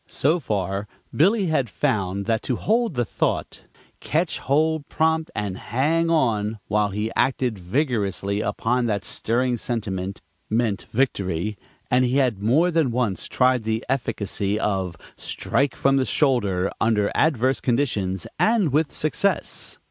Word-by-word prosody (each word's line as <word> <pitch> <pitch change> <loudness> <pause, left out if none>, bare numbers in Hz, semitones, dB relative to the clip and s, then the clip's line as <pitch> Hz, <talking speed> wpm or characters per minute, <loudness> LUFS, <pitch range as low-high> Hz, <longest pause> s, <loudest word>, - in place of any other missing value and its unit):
So 155 +6 +1
far 100 - -2 0.3
Billy 200 +6 +4
had 150 -8 +1
found 100 -7 -1
that 110 -1 +1
to 125 - +2
hold 225 - +1
the 120 -1 +1
thought, - - -2 0.4
"Ketch 160 +3 0
hold 155 +2 +1
prompt 160 0 +1
and 100 -3 -3
hang 155 +8 +1
on," 115 -9 +1
while 105 -1 +1
he 105 +3 -2
acted 125 -5 +1
vigorously 100 - -1
upon 120 +3 0
that 105 -2 -1
stirring 120 +5 0
sentiment, 100 -5 -3 0.3
meant 110 -2 0
victory, 105 -6 0 0.4
and 125 +1 +4
he 125 +2 +1
had 125 -8 +1
more 150 +12 +3
than 160 -5 +2
once 115 -5 -1
tried 130 -1 +2
the 110 +1 -2
efficacy 105 -5 -1
of, 95 -5 -1 0.2
"Strike 140 -1 -1
from 135 0 +2
the 130 - +2
shoulder," 100 - +1
under 105 -2 +2
adverse 130 -4 +2
conditions 105 -8 0
and 220 - +3
with 150 +1 +2
success. 175 +6 -1
120 Hz, 140 wpm, -23 LUFS, 105-145 Hz, 0.4 s, Billy